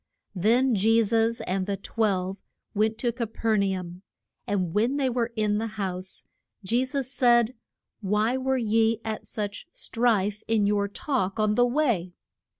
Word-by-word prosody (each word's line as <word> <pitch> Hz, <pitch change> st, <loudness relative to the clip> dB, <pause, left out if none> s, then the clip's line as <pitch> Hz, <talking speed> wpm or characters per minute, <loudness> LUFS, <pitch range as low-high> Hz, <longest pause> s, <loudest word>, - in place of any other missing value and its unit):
Then 235 Hz, +7 st, +3 dB
Je 225 Hz, +3 st, +4 dB
sus 225 Hz, +1 st, +1 dB
and 185 Hz, +1 st, -2 dB
the 200 Hz, -1 st, -1 dB
twelve 195 Hz, -2 st, -1 dB, 0.3 s
went 215 Hz, +1 st, +1 dB
to 240 Hz, +1 st, 0 dB
Ca 235 Hz, -1 st, -3 dB
per 225 Hz, 0 st, 0 dB
na 195 Hz, -2 st, +1 dB
um. 175 Hz, 0 st, -9 dB, 0.5 s
And 185 Hz, -5 st, -1 dB
when 235 Hz, +7 st, +1 dB
they 265 Hz, -3 st, +1 dB
were 235 Hz, -1 st, -1 dB
in 210 Hz, -1 st, +1 dB
the 225 Hz, -, -2 dB
house 185 Hz, -2 st, -4 dB, 0.4 s
Je 235 Hz, +6 st, +2 dB
sus 260 Hz, -1 st, -3 dB
said, 240 Hz, -3 st, +4 dB, 0.5 s
Why 210 Hz, +4 st, +1 dB
were 265 Hz, 0 st, 0 dB
ye 225 Hz, -1 st, +2 dB
at 220 Hz, -1 st, -4 dB
such 205 Hz, +5 st, -5 dB
strife 210 Hz, -, 0 dB
in 220 Hz, -2 st, +2 dB
your 200 Hz, 0 st, +1 dB
talk 210 Hz, -2 st, -2 dB
on 215 Hz, -1 st, +2 dB
the 245 Hz, +3 st, +4 dB
way? 240 Hz, -, 0 dB
220 Hz, 160 wpm, -26 LUFS, 200-240 Hz, 0.5 s, Je